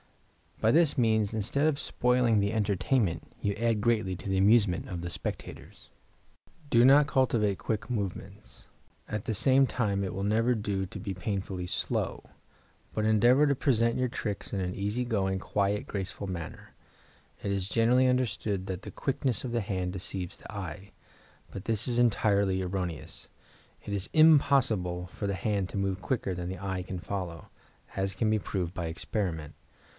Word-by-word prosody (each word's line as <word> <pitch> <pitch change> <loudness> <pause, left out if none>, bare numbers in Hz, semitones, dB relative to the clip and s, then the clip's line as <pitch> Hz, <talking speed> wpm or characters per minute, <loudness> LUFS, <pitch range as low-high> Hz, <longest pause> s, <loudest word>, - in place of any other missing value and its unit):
By 110 - +3
this 160 0 +3
means, 110 -3 +2
instead 110 +7 0
of 150 -2 +1
spoiling 125 -3 +2
the 100 +2 0
entertainment, 105 -1 0
you 100 - 0
add 115 0 0
greatly 110 -5 +1
to 95 - -7
the 95 - +1
amusement 100 -2 +4
of 85 -2 -4
the 85 - -4
spectators. - - -7 0.8
Do 120 +1 +6
not 140 +2 +7
cultivate 115 -8 +2
quick 105 +10 -3
movements; 100 - -5 0.4
at 105 -1 -4
the 110 - -1
same 130 +5 +4
time 100 -6 -1
it 95 - -3
will 95 - -3
never 115 +4 +2
do 100 -3 -2
to - - -8
be 100 -3 -4
painfully 95 -1 -3
slow; 90 - -2 0.7
but 110 - 0
endeavor 120 +7 +5
to 140 - +2
present 115 -4 +2
your 130 - +1
tricks 105 -5 -5
in 100 - 0
an 90 -1 -2
easy 105 +5 -1
going, 95 -5 0
quiet, 100 +2 -1
graceful 100 0 -4
manner. 85 -3 -7 0.7
It 100 - -1
is 95 -1 -1
generally 125 +4 +4
understood 110 -6 0
that 95 -1 -4
"the - - -7
quickness 130 -4 -1
of 125 - -4
the 120 -1 0
hand 95 -3 -2
deceives 95 -1 -5
the - - -11
eye," 95 -1 -7 0.6
but 95 - -7
this 115 -1 0
is 120 -1 -1
entirely 100 -5 +2
erroneous. 90 -4 -4 0.5
It 100 - -5
is 100 -1 -2
impossible 120 - +4
for 105 - -4
the 100 -1 -1
hand 100 -2 -1
to - - -5
move 95 -1 -1
quicker 110 -6 -1
than 90 0 -4
the 95 -1 -5
eye 95 -2 -2
can 90 0 -5
follow, 90 -3 -5 0.5
as 95 0 -1
can 110 +3 +1
be 110 - +2
proved 90 -3 -3
by 85 - -3
experiment. 80 -2 -3
100 Hz, 170 wpm, -29 LUFS, 95-115 Hz, 0.8 s, not